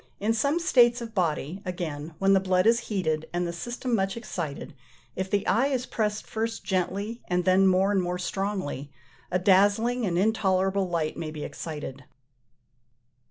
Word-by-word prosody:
In 215 +3 +1
some 280 +8 +1
states 245 -7 +4
of 230 -2 -7
body, 175 -1 -1
again, 165 -4 -5
when 195 +2 +3
the 195 - +5
blood 185 -1 +2
is 230 +1 +5
heated, 160 -7 -1
and 175 0 -1
the 170 - -3
system 240 +7 -4
much 195 -1 0
excited, 170 -13 -5 0.4
if 190 0 -3
the 200 0 0
eye 240 +6 +3
is 260 -3 -1
pressed 210 -3 -2
first 225 +1 -3
gently, 200 +5 -2
and 180 0 0
then 190 +1 +5
more 190 +2 +3
and 195 -2 +2
more 180 0 -2
strongly, 185 -7 -3 0.4
a 180 - +1
dazzling 205 +6 +3
and 170 -2 0
intolerable 190 -2 +1
light 165 -3 -1
may 160 - -4
be 155 -1 -6
excited. 145 -3 -6
190 Hz, 165 wpm, -27 LUFS, 175-220 Hz, 0.4 s, the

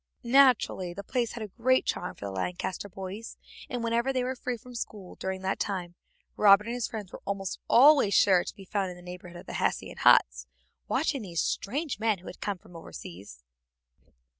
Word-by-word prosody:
Naturally 240 -8 +4
the 200 - -6
place 240 +1 -1
had 235 - -5
a - - -5
great 255 +5 +2
charm 180 - -2
for - - -8
the 100 - -4
Lancaster 180 - -3
boys, 195 +4 -7 0.3
and 245 -1 -3
whenever 235 +3 +1
they 255 -1 0
were 255 +1 -1
free 250 -1 -3
from 250 +2 -13
school 210 -5 -6
during 190 0 -5
that 190 - -1
time 180 -4 -3 0.4
Robert 205 0 +6
and 235 - -3
his 245 -1 -2
friends 210 -5 -7
were - - -9
almost 195 -1 -3 0.5
sure 185 -3 +5
to - - -8
be 195 - -12
found 195 0 -1
in 180 - -8
the 180 - -14
neighborhood 180 -1 -9
of - - -11
the - - -8
Hessian - - -1
huts, 60 0 +4 0.4
watching 275 -1 0
these 175 -5 -2
strange 280 +4 -2
men 220 -2 +2
who 180 - -18
had - - -10
come 205 -2 -2
from 185 -2 -18
overseas. 90 - -10
200 Hz, 195 wpm, -28 LUFS, 180-235 Hz, 0.5 s, Robert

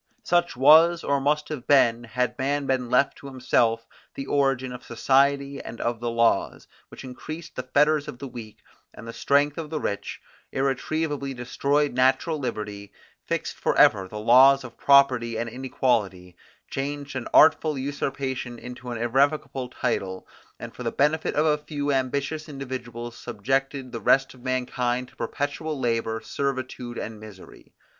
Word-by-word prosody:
Such 175 -6 +1
was, 160 +5 +6
or 140 -1 0
must 150 +2 +1
have 145 -5 -6
been, 120 -4 +4
had 125 +2 -1
man 140 +2 0
been 130 -2 -1
left 125 +3 +2
to 140 - -10
himself, 120 -3 +1 0.3
the 135 - -5
origin 135 -3 0
of 125 - -9
society 140 +3 +1
and 115 - -9
of 120 -1 -2
the 120 0 -2
laws, 115 -3 +1 0.2
which - - -12
increased 155 +5 -8
the - - -2
fetters 150 +3 +2
of - - -7
the 135 - -7
weak, 115 -4 -10 0.3
and 115 - -11
the 115 - -6
strength 145 +4 +1
of 155 -2 -6
the 155 -1 -3
rich; 100 -5 -4 0.3
irretrievably 140 +1 -2
destroyed 140 +4 0
natural 130 +5 +2
liberty, 105 -5 -5 0.4
fixed - - -3
for - - 0
ever 95 -3 +5
the 105 - -8
laws 130 +5 +6
of 120 -2 -10
property 130 -5 +4
and 115 +1 -3
inequality; 110 -8 -1 0.3
changed 145 0 -5
an 130 - -4
artful 155 -1 +5
usurpation 135 -2 -3
into 125 +1 -9
an 120 - -4
irrevocable 135 +2 0
title; 95 -6 -3 0.3
and - - -8
for - - -10
the - - -2
benefit 150 +3 +1
of 150 - +2
a 150 -1 +2
few 145 -1 -3
ambitious 140 +4 -2
individuals 125 -4 -6
subjected 135 +3 -2
the 115 - -6
rest 135 0 +3
of 130 - -17
mankind 125 -1 -2
to - - -24
perpetual 145 +1 -3
labour, 115 -2 -1
servitude, 130 -3 -4
and 110 -1 -6
misery. 105 -3 -14
130 Hz, 160 wpm, -25 LUFS, 120-140 Hz, 0.4 s, was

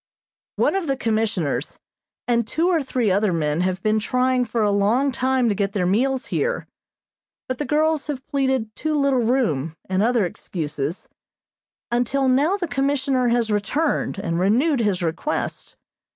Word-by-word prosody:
One - - +2
of 385 -4 -1
the 270 -1 0
Commissioners 220 - -1 0.5
and 235 -2 +1
two 335 +8 +1
or 335 -4 +2
three 250 -6 0
other 200 +1 +2
men 155 -1 0
have 185 +1 -1
been 215 0 +2
trying 255 +2 +1
for 225 -1 -1
a 205 - +2
long 220 +8 +2
time 260 -1 +1
to 215 - +2
get 200 0 -1
their 185 -3 0
meals 255 +8 +1
here, - - -1 0.8
but 255 -1 -3
the 295 - -1
girls 310 0 +1
have 270 -3 -4
pleaded 265 -6 -1
too 310 -1 -1
little 280 -3 +2
room, 195 - 0
and 185 +1 0
other 230 -2 +2
excuses, 155 -2 -4 0.8
until 245 +3 +1
now 290 +9 +3
the 360 -3 -3
Commissioner 270 -3 0
has 235 -2 +1
returned, 215 +7 0
and 170 -3 -2
renewed 250 - +2
his 205 -5 0
requests. 170 - -3
240 Hz, 160 wpm, -22 LUFS, 200-275 Hz, 0.8 s, now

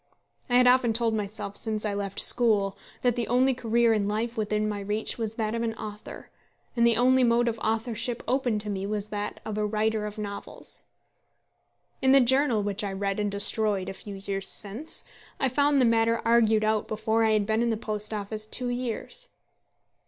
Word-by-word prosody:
I 245 - +2
had 250 - +5
often 250 -2 +4
told 230 0 +1
myself 205 -1 -4
since 215 0 +1
I 210 - -1
left 200 -1 -3
school 210 -5 +4 0.3
that 245 -2 +2
the 235 -3 -2
only 255 +3 +3
career 235 -1 +2
in 205 -2 0
life 225 +3 -2
within 215 -1 -1
my 210 -1 -3
reach 210 +4 -1
was 225 -1 -3
that 220 -1 -2
of 230 - -2
an 225 -1 -2
author, 210 -1 -9 0.4
and 235 -1 +4
the 230 -1 +3
only 255 +2 +4
mode 240 0 +3
of 230 -1 -2
authorship 225 +2 -2
open 250 -4 +1
to 210 0 -4
me 195 0 -3
that 210 0 -4
of 215 -1 -3
a 210 - +1
writer 215 0 0
of 210 +1 -8
novels. 200 -1 -6 1.1
In 265 0 +4
the 275 - +7
journal 255 -3 +3
which 205 0 -3
I 200 - -2
read 195 +1 -2
and 210 -1 0
destroyed 200 -1 +1
a - - -5
few 200 +1 -9
years 195 0 -4
since, 225 +11 -2 0.4
I 270 - +2
found 285 +2 +2
the 255 - +4
matter 230 0 +2
argued 225 -2 +4
out 215 0 0
before 220 +1 0
I 220 -1 +3
had 210 -1 +2
been 220 +2 0
in 235 - +1
the 225 - 0
Post 215 -1 -4
Office 215 +1 -4
two 250 +3 -3
years. 245 - -4
220 Hz, 195 wpm, -27 LUFS, 210-235 Hz, 1.1 s, the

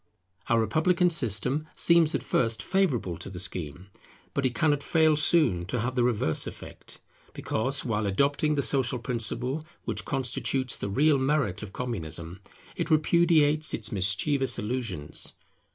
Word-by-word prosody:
Our 115 - +4
republican 165 - +2
system 130 - +2
seems 170 -2 +4
at - - -2
first 115 -1 0
sight - - -13
favourable 140 - 0
to - - -8
the 95 - -9
scheme; 90 0 -5 0.4
but 140 -2 +1
it 125 - -6
cannot 150 -3 +2
fail 160 +1 +3
soon 150 - +3
to 120 - -2
have 125 +3 -2
the 125 -2 +1
reverse 110 -10 0
effect, - - -9 0.3
because, 135 +5 -1
while 110 -3 -1
adopting 140 +9 +1
the 140 - 0
social 135 -1 +1
principle 125 +4 -2 0.2
which - - -3
constitutes 130 -1 -2
the 100 - -5
real 145 +7 +3
merit 130 -8 0
of 105 -3 -8
Communism, 85 -7 -5 0.4
it - - -3
repudiates 155 -1 +3
its - - -7
mischievous 110 +8 0
illusions. 110 - -4
130 Hz, 150 wpm, -27 LUFS, 105-150 Hz, 0.4 s, Our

